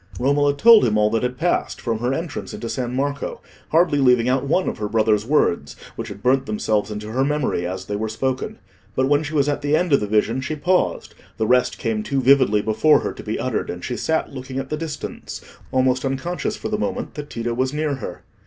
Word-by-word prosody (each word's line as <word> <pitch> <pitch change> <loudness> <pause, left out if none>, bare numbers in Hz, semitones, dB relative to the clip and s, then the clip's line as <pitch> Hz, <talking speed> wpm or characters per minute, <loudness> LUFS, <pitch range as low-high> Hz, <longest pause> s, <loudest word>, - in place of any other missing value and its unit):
Romola 140 +2 +2
told 230 +4 +8
him 105 -2 +2
all 105 0 +3
that 115 - +1
had 125 0 -2
passed, 175 +5 0
from 115 -2 -2
her 120 +2 0
entrance 160 +3 -4
into 115 - -6
San 125 +1 -3
Marco, 140 +1 -2 0.3
hardly 160 -2 +3
leaving 125 -3 +4
out 130 +1 +2
one 160 +7 +1
of - - -3
her 105 -1 -2
brother's 110 -1 +2
words, 85 - +1 0.2
which - - -5
had 100 - -9
burnt 135 +1 +2
themselves 105 0 0
into 105 0 -6
her 130 +3 +1
memory 140 -11 0
as 95 +1 -5
they 105 - -3
were 110 +1 -2
spoken. 130 +4 -2 0.4
But 130 0 +2
when 145 +1 +3
she 155 0 -5
was 145 -1 +3
at 145 - -1
the 145 +1 +2
end 175 -3 0
of 140 - +6
the 105 - -3
vision, 110 +4 +1
she 145 +4 -3
paused; 180 +4 0 0.2
the 110 - 0
rest 125 +3 +2
came 110 -3 -1
too 135 +5 -1
vividly 130 -6 +4
before 110 +8 +4
her - - -3
to - - -9
be - - -3
uttered, - - -2
and 90 0 -5
she 125 - -3
sat 160 +2 -1
looking 130 0 -6
at 135 0 -4
the - - +1
distance, 155 -2 -6 0.3
almost 130 0 +2
unconscious 155 +10 -2
for - - -5
the 210 0 -1
moment 245 +1 -3
that 145 -1 -7
Tito 120 0 -3
was 130 +2 0
near 150 -1 -1
her. - - -7
130 Hz, 230 wpm, -22 LUFS, 110-145 Hz, 0.4 s, told